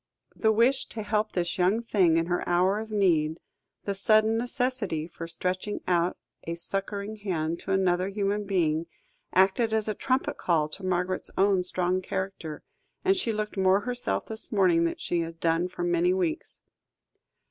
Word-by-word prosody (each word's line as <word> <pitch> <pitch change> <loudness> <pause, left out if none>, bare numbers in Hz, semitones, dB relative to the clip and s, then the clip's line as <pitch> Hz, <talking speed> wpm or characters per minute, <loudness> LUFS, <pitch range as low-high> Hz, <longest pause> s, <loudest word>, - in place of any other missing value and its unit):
The 220 - +2
wish 240 +5 +3
to 220 - -5
help 210 +1 0
this 175 +1 -1
young 195 +6 +2
thing 185 -8 +3
in 165 - +2
her 175 +1 -1
hour 185 +4 +3
of 220 0 -6
need, 170 -7 +2 0.5
the 200 - -1
sudden 215 +3 +3
necessity 240 - -1
for 165 -1 -8
stretching 185 +4 -3
out 175 0 +1 0.3
a 170 - -3
succouring 200 +4 -2
hand 170 -5 -2
to - - -5
another 185 -1 +2
human 205 +1 -1
being, 165 -4 0 0.4
acted 195 +5 +3
as 220 -1 +1
a 215 - 0
trumpet 255 +5 -1
call 155 -4 +1
to 190 +5 -8
Margaret's 185 0 -1
own 195 -1 +4
strong 180 0 0
character, 185 -5 -5 0.4
and 385 +1 +4
she 305 -12 0
looked 210 -1 -3
more 190 +1 +4
herself 245 +2 -1
this 220 -1 -6
morning, 180 -5 +3
than 165 - -1
she 175 - -1
had 165 0 -4
done 165 +1 +1
for 180 -1 -6
many 175 +1 +2
weeks. 175 -4 -2
190 Hz, 170 wpm, -27 LUFS, 175-215 Hz, 0.5 s, own